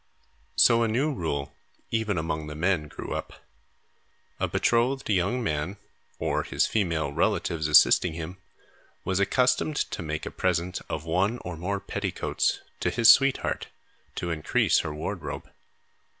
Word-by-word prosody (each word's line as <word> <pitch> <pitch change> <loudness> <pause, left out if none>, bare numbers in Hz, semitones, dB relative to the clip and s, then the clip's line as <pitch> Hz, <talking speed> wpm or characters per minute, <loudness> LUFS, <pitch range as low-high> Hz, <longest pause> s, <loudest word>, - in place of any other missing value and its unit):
So, 115 -1 +5
a 115 - +3
new 135 +8 +1
rule, 70 - -3 0.4
even 110 -4 0
among 80 -1 -2
the 75 - -7
men, 85 -1 0
grew - - -7
up. - - -7 0.9
A - - +1
betrothed 125 +3 +1
young 100 +7 +1
man, 80 +1 -2 0.4
or - - 0
his - - 0
female 85 -9 0
relatives 80 -2 0
assisting 75 +2 +5
him, 85 +3 -6 0.7
was 95 0 0
accustomed 125 +8 +2
to - - -2
make 80 -1 -4
a - - -5
present 90 0 -1
of 80 0 -4
one 95 +8 +1
or 90 -1 -4
more 95 +5 -2
petticoats - - -2 0.2
to - - 0
his 115 -1 +7
sweetheart 135 -1 +2 0.5
to 85 - -3
increase 80 -2 +2
her 80 - -3
wardrobe. 75 +1 -5
90 Hz, 140 wpm, -27 LUFS, 80-115 Hz, 0.9 s, his